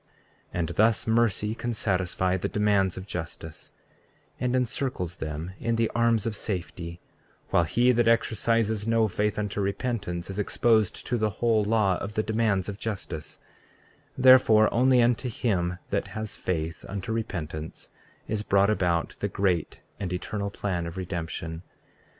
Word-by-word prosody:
34:16 -, -, -1 dB
And 85 Hz, -1 st, 0 dB
thus 110 Hz, +5 st, +2 dB
mercy 110 Hz, -2 st, +2 dB
can 120 Hz, +1 st, -3 dB
satisfy 90 Hz, -2 st, 0 dB
the 95 Hz, -, -2 dB
demands 100 Hz, -3 st, +2 dB
of 95 Hz, -, -6 dB
justice, 80 Hz, -3 st, -7 dB, 0.7 s
and 125 Hz, 0 st, 0 dB
encircles 125 Hz, -, -2 dB
them 80 Hz, +3 st, -5 dB
in 115 Hz, 0 st, 0 dB
the 115 Hz, -1 st, +1 dB
arms 115 Hz, -2 st, +2 dB
of 115 Hz, -2 st, -2 dB
safety, 85 Hz, -4 st, -5 dB, 0.5 s
while 85 Hz, -, +4 dB
he 120 Hz, +11 st, +3 dB
that 120 Hz, -1 st, +2 dB
exercises 115 Hz, -1 st, +2 dB
no 115 Hz, -1 st, +3 dB
faith 105 Hz, +1 st, -1 dB
unto 105 Hz, -1 st, -2 dB
repentance 100 Hz, -4 st, -2 dB
is 95 Hz, -, -5 dB
exposed 110 Hz, 0 st, +2 dB
to 120 Hz, -, -1 dB
the 110 Hz, 0 st, +2 dB
whole 110 Hz, 0 st, +1 dB
law 105 Hz, -3 st, +2 dB
of 105 Hz, +1 st, -6 dB
the 110 Hz, -, +1 dB
demands 110 Hz, -4 st, +1 dB
of 105 Hz, 0 st, -5 dB
justice; 95 Hz, -9 st, -5 dB, 0.8 s
therefore 125 Hz, -4 st, +6 dB
only 125 Hz, 0 st, +5 dB
unto 120 Hz, +1 st, +1 dB
him 90 Hz, -7 st, -1 dB
that 100 Hz, -, 0 dB
has 110 Hz, -1 st, -4 dB
faith 80 Hz, -2 st, -3 dB
unto 100 Hz, +2 st, -4 dB
repentance 80 Hz, -8 st, -5 dB, 0.4 s
is 110 Hz, -1 st, -1 dB
brought 100 Hz, 0 st, +3 dB
about 85 Hz, -5 st, 0 dB
the 100 Hz, -, 0 dB
great 95 Hz, -4 st, -1 dB, 0.2 s
and 95 Hz, -3 st, -3 dB
eternal 100 Hz, +3 st, -3 dB
plan 90 Hz, -4 st, -3 dB
of 85 Hz, -, -7 dB
redemption. 85 Hz, -2 st, -4 dB
105 Hz, 150 wpm, -27 LUFS, 90-115 Hz, 0.8 s, therefore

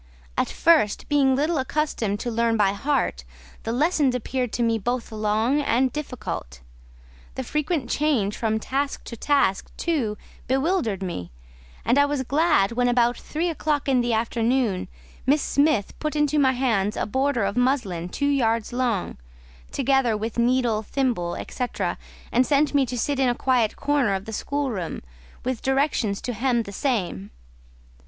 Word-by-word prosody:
At -, -, 0 dB
first, 310 Hz, -11 st, +3 dB
being 275 Hz, -3 st, +4 dB
little 300 Hz, +3 st, +1 dB
accustomed 260 Hz, -7 st, -1 dB
to 240 Hz, -, -2 dB
learn 230 Hz, 0 st, +1 dB
by 200 Hz, -2 st, +3 dB
heart, 230 Hz, -, -1 dB, 0.4 s
the 225 Hz, -, -3 dB
lessons 285 Hz, 0 st, +2 dB
appeared 250 Hz, 0 st, -2 dB
to 240 Hz, -, 0 dB
me 230 Hz, -1 st, +1 dB
both 245 Hz, +3 st, -2 dB
long 220 Hz, +6 st, +1 dB
and 260 Hz, -2 st, +1 dB
difficult; 215 Hz, -, -5 dB, 0.7 s
the 260 Hz, -, -3 dB
frequent 300 Hz, 0 st, -1 dB
change 245 Hz, -8 st, +1 dB
from 220 Hz, -1 st, 0 dB
task 275 Hz, +5 st, -2 dB
to 235 Hz, -, -7 dB
task, 230 Hz, -6 st, +1 dB
too, 260 Hz, -11 st, -1 dB, 0.3 s
bewildered 265 Hz, -, 0 dB
me; 130 Hz, -, -4 dB, 0.6 s
and 250 Hz, +4 st, +4 dB
I 285 Hz, -, +6 dB
was 285 Hz, -2 st, -1 dB
glad 280 Hz, -, +2 dB
when, 245 Hz, +1 st, +1 dB
about 240 Hz, 0 st, +3 dB
three 325 Hz, +3 st, -3 dB
o'clock 305 Hz, -4 st, -1 dB
in 260 Hz, -2 st, +3 dB
the 240 Hz, 0 st, 0 dB
afternoon, 230 Hz, -1 st, 0 dB, 0.4 s
Miss 285 Hz, +2 st, +3 dB
Smith 285 Hz, -8 st, +2 dB
put 305 Hz, -1 st, -2 dB
into 295 Hz, 0 st, +2 dB
my 265 Hz, -2 st, +4 dB
hands 225 Hz, -6 st, 0 dB
a -, -, 0 dB
border 265 Hz, +1 st, 0 dB
of 200 Hz, +1 st, -1 dB
muslin 240 Hz, -10 st, 0 dB
two 285 Hz, -, -2 dB
yards 230 Hz, -6 st, +1 dB
long, 240 Hz, -, -1 dB, 0.5 s
together 270 Hz, -4 st, +2 dB
with 225 Hz, +2 st, -3 dB
needle, 240 Hz, -2 st, +2 dB
thimble, 220 Hz, -8 st, -1 dB
&c., 250 Hz, -, -2 dB, 0.7 s
and 250 Hz, -, +4 dB
sent 290 Hz, +2 st, +2 dB
me 275 Hz, -2 st, +3 dB
to 245 Hz, -, -4 dB
sit 275 Hz, +4 st, -1 dB
in 260 Hz, -2 st, +3 dB
a 240 Hz, -, 0 dB
quiet 245 Hz, -5 st, +1 dB
corner 280 Hz, -8 st, +1 dB
of 190 Hz, +1 st, -5 dB
the 220 Hz, -, -7 dB
schoolroom, 245 Hz, -, -3 dB, 0.4 s
with 255 Hz, -2 st, -2 dB
directions 265 Hz, -7 st, 0 dB
to 245 Hz, -, -3 dB
hem 240 Hz, +1 st, +1 dB
the 200 Hz, -, -9 dB
same. 190 Hz, -, -2 dB
250 Hz, 160 wpm, -24 LUFS, 220-280 Hz, 0.7 s, I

